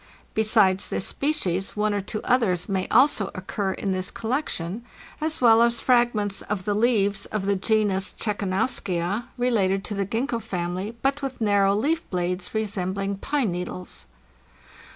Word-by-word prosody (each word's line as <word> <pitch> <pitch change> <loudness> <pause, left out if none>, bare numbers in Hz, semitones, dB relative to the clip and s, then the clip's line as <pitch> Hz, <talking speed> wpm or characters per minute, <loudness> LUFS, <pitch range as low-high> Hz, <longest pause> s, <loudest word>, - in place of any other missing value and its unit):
Besides 215 -3 +3
this - - -2
species, 195 - -1
one 210 0 +1
or 205 - 0
two 215 +2 -5
others 200 -9 +2
may 190 -2 -1
also 235 -5 +4
occur 190 +1 -2
in 195 - -3
this 185 0 -1
collection, 225 - -3 0.4
as 315 -2 -2
well 230 -2 +7
as 235 0 +3
fragments 235 -6 +2
of 200 -3 -4
the 205 - +1
leaves 205 -3 +1
of 210 -3 -3
the 200 0 +2
genus 205 -1 +1
Czekanowskia, 200 -1 -1
related 200 -6 +1
to 210 - -5
the 200 -2 -1
Gingko 235 +3 -1
family, 185 +5 -4
but 275 +2 +1
with 270 -2 -4
narrow 200 -2 +3
leaf 305 +10 0
blades 180 +2 -2
resembling 200 -2 -1
pine 265 -1 0
needles. 180 +1 -6
205 Hz, 150 wpm, -25 LUFS, 190-235 Hz, 0.4 s, well